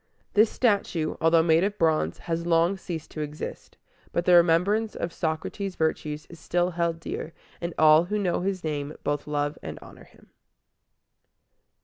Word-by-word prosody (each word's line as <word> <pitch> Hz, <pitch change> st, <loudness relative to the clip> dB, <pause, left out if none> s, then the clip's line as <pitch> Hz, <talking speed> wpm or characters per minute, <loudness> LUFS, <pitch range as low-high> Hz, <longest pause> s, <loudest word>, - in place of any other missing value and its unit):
This 215 Hz, +1 st, +5 dB
statue, 200 Hz, -9 st, 0 dB
although 165 Hz, 0 st, +5 dB
made 165 Hz, +1 st, +4 dB
of 205 Hz, +1 st, -1 dB
bronze, 155 Hz, -, +1 dB
has 170 Hz, 0 st, -3 dB
long 170 Hz, +3 st, +3 dB
ceased 170 Hz, -4 st, -7 dB
to 155 Hz, -, -5 dB
exist; 150 Hz, 0 st, -7 dB, 0.3 s
but 170 Hz, -, -1 dB
the 180 Hz, -, +5 dB
remembrance 180 Hz, +6 st, +4 dB
of 170 Hz, -, -4 dB
Socrates' 175 Hz, +4 st, -3 dB
virtues 155 Hz, -1 st, -2 dB
is 170 Hz, -, -13 dB
still 175 Hz, +3 st, 0 dB
held 170 Hz, -1 st, -1 dB
dear, 165 Hz, 0 st, -6 dB, 0.3 s
and 170 Hz, -1 st, -4 dB
all 155 Hz, +1 st, +6 dB
who 210 Hz, +4 st, -2 dB
know 185 Hz, -4 st, 0 dB
his 190 Hz, 0 st, -2 dB
name 150 Hz, -1 st, -3 dB
both 145 Hz, 0 st, -2 dB
love 145 Hz, 0 st, -2 dB
and -, -, -7 dB
honor -, -, -14 dB
him. -, -, -23 dB
165 Hz, 160 wpm, -26 LUFS, 155-180 Hz, 0.3 s, all